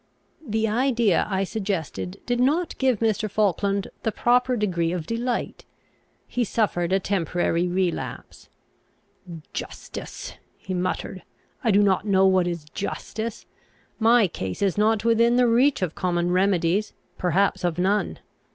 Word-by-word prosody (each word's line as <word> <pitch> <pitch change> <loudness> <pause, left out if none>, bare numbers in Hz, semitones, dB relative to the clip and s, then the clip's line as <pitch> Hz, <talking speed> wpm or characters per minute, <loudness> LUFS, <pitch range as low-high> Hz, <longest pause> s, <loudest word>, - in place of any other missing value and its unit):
The 220 -4 0
idea 235 -3 +2
I 195 -1 0
suggested 180 - -4
did 245 0 0
not 310 +7 +1
give 260 -5 +2
Mr. 220 -1 +1
Falkland 200 -1 0
the 220 - 0
proper 250 +3 +2
degree 170 -6 0
of 175 -3 -3
delight. 235 +4 -3 0.6
He 245 - -1
suffered 195 -6 0
a 190 - +3
temporary 175 -2 0
relapse. 180 -1 -3 1.0
"Justice!" - - -7 0.2
he 190 - -6
muttered. 185 +1 -3 0.4
"I 235 - +2
do 205 0 +5
not 195 +1 +2
know 195 -1 +4
what 185 -2 +3
is 170 -3 -4
justice. 220 +2 -5 0.5
My 230 -1 +5
case 95 - -4
is 195 -3 +1
not 215 +1 +2
within 230 +1 +4
the 250 0 +4
reach 245 0 +3
of 170 -3 -2
common 175 -1 0
remedies; 185 +1 +1 0.3
perhaps 185 +2 +1
of 175 -2 0
none. 195 +4 0
200 Hz, 135 wpm, -24 LUFS, 180-230 Hz, 1.0 s, do